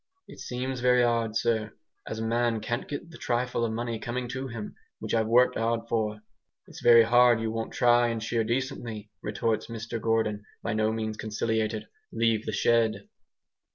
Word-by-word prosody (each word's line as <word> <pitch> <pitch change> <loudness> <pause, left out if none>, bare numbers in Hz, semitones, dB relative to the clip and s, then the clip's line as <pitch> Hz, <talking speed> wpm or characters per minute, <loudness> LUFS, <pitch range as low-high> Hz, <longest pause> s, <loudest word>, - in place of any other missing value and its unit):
"It - - -12
seems 130 +1 -4
very 125 0 +4
'ard, 115 -2 +1
sir, 110 -3 0 0.3
as 110 - -4
a 110 - -3
man 115 0 +1
can't 120 +3 -3
get 145 +4 -6
the 170 - -12
trifle 120 0 -1
of 115 - 0
money 115 0 -3
coming 125 +2 -3
to 130 +2 -4
him, 115 -4 -6 0.2
which - - -5
I've 110 -1 +2
worked 125 +2 +4
'ard 115 0 0
for." 105 -2 -1 0.4
"It's - - -12
very 115 -1 +8
hard 120 0 +5
you 115 0 -2
won't 115 0 -4
try 120 -2 +4
and 115 -1 -2
shear 115 0 0
decently," 115 -3 -3
retorts 110 +1 -1
Mr 115 0 -5
Gordon, 110 -2 0 0.2
by 115 - -1
no 110 0 +1
means 110 -1 -3
conciliated. 110 0 -2 0.2
"Leave 115 -1 +1
the - - 0
shed!" 110 -3 +2
115 Hz, 180 wpm, -27 LUFS, 110-120 Hz, 0.4 s, very